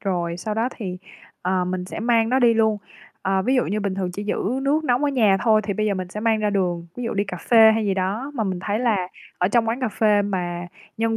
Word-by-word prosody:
rồi 175 -3 -2
sau 210 +4 -4
đó 225 +3 0
thì, 185 -5 -5 0.4
ờ, 185 0 0
mình 180 0 -3
sẽ 185 - -7
mang 230 -1 +2
nó 255 - +2
đi 240 -3 +4
luôn. 220 -2 +2 0.4
Ờ, 190 0 +1
ví 255 +7 +1
dụ 250 - +2
như 210 +1 -2
bình 200 -2 -2
thường 185 -2 -2
chỉ 205 +3 -5
giữ 210 +4 -1
nước 300 +3 +1
nóng 250 0 +1
ở 285 - +2
nhà 215 -7 +3
thôi 220 -2 +4
thì 205 - -1
bây 215 +1 0
giờ 205 - +1
mình 185 -1 -4
sẽ 210 +3 -6
mang 225 0 +2
ra 210 -1 +1
đường. 175 -4 -1
Ví 245 - -4
dụ 230 - -2
đi 200 0 +1
cà 185 - -6
phê 225 -2 +8
hay 220 -1 0
gì 195 - +1
đó, 205 +9 -2
mà 225 -5 -1
mình 185 -2 -2
thấy 205 +2 -1
là 210 -7 0 0.3
ở 180 - +2
trong 230 +1 +2
quán 235 +4 -2
cà 255 - 0
phê 210 -1 +2
mà 175 -3 -3 0.3
nhân 225 0 0
210 Hz, 275 wpm, -22 LUFS, 190-230 Hz, 0.4 s, phê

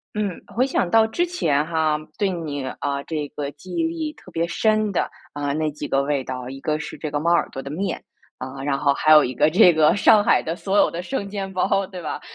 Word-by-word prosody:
嗯， 205 -4 -2
回 250 +3 +3
想 225 -9 0
到 225 +3 +5
之 285 +11 0
前 155 - 0
哈， 160 -2 +1 0.2
对 200 -2 +1
你， 150 -6 -4
呃， 140 +1 -3
这 155 -3 -3
个 145 -1 -5
记 145 +6 -10
忆 335 - +1
力 325 -2 -2
特 185 - -16
别 165 +1 -1
深 215 +2 +1
的， 190 - 0 0.3
呃， 145 -1 -2
那 155 +1 0
几 145 0 -6
个 135 - +1
味 140 -1 -1
道， 125 -1 -6
一 135 0 -8
个 155 +2 -1
是 - - -7
这 155 -2 -5
个 145 - -1
猫 170 +3 +1
耳 170 - +3
朵 135 - -6
的 140 - -8
面， 185 +4 -3 0.4
呃， 135 +1 -7
然 140 -1 0
后 140 -1 +3
还 155 - +2
有 150 -2 +9
一 125 - -4
个 150 +4 +4
这 175 +1 +6
个 155 -1 +4
上 210 +1 +6
海 - - +4
的 165 - -3
所 195 +3 -1
有 - - +5
的 175 +1 -5
生 200 -2 -4
煎 195 -1 -4
包， 190 +1 +1
对 185 -2 -8
吧？ 155 - -5
160 Hz, 265 characters per minute, -22 LUFS, 145-200 Hz, 0.4 s, 有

